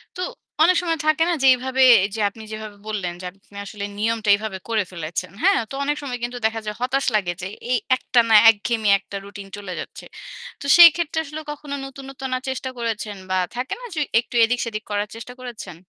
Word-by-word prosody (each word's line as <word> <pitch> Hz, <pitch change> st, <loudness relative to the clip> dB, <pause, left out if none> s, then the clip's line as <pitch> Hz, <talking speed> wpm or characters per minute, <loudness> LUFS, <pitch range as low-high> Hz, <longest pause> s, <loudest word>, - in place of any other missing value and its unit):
তো 365 Hz, -, -5 dB, 0.4 s
অনেক 365 Hz, +2 st, +5 dB
সময় 330 Hz, -2 st, -1 dB
থাকে 310 Hz, +1 st, +3 dB
না -, -, +2 dB
যে 270 Hz, -, +5 dB
এইভাবে 260 Hz, +1 st, -1 dB, 0.2 s
এইযে 215 Hz, +2 st, -4 dB
আপনি 220 Hz, +2 st, -13 dB
যেভাবে 215 Hz, -1 st, -7 dB
বললেন 190 Hz, -5 st, -3 dB
যে -, -, -7 dB
আপনি 195 Hz, +1 st, -17 dB
আসলে 200 Hz, 0 st, -6 dB
নিয়মটা 220 Hz, 0 st, 0 dB
এভাবে 210 Hz, -2 st, -5 dB
করে 220 Hz, -2 st, +1 dB
ফেলেছেন। 170 Hz, +1 st, -5 dB
হ্যাঁ? 390 Hz, +1 st, +5 dB
তো -, -, -9 dB
অনেক 295 Hz, +1 st, 0 dB
সময় 255 Hz, -4 st, -4 dB
কিন্তু 245 Hz, +1 st, -3 dB
দেখা 225 Hz, 0 st, +1 dB
যায় 210 Hz, 0 st, -4 dB
হতাশ 265 Hz, +2 st, 0 dB
লাগে 190 Hz, -4 st, +1 dB
যে 180 Hz, -, -4 dB, 0.2 s
এই 250 Hz, -, +4 dB, 0.2 s
একটানা 230 Hz, -3 st, +3 dB
একঘেমি 220 Hz, 0 st, +1 dB
একটা 200 Hz, -, -11 dB
রুটিন 200 Hz, 0 st, -10 dB
চলে 200 Hz, -3 st, -6 dB
যাচ্ছে। -, -, -8 dB, 0.6 s
তো -, -, -7 dB
সেই 345 Hz, -1 st, +12 dB
ক্ষেত্রে 325 Hz, -2 st, -1 dB
আসলে 305 Hz, +2 st, -7 dB
কখনো 290 Hz, -1 st, -6 dB
নতুন, 270 Hz, 0 st, -10 dB
নতুন 265 Hz, 0 st, -6 dB
আ -, -, -6 dB
চেষ্টা 260 Hz, 0 st, -3 dB
করেছেন 220 Hz, -3 st, -3 dB
বা 185 Hz, -, +1 dB, 0.2 s
থাকে 250 Hz, +2 st, -3 dB
না -, -, -8 dB
যে -, -, -1 dB, 0.2 s
একটু 240 Hz, +1 st, -7 dB
এদিক-সেদিক 230 Hz, -2 st, -2 dB
করার 205 Hz, 0 st, -1 dB
চেষ্টা 230 Hz, +2 st, -9 dB
করেছেন? 235 Hz, -8 st, -8 dB
230 Hz, 205 wpm, -22 LUFS, 205-265 Hz, 0.6 s, সেই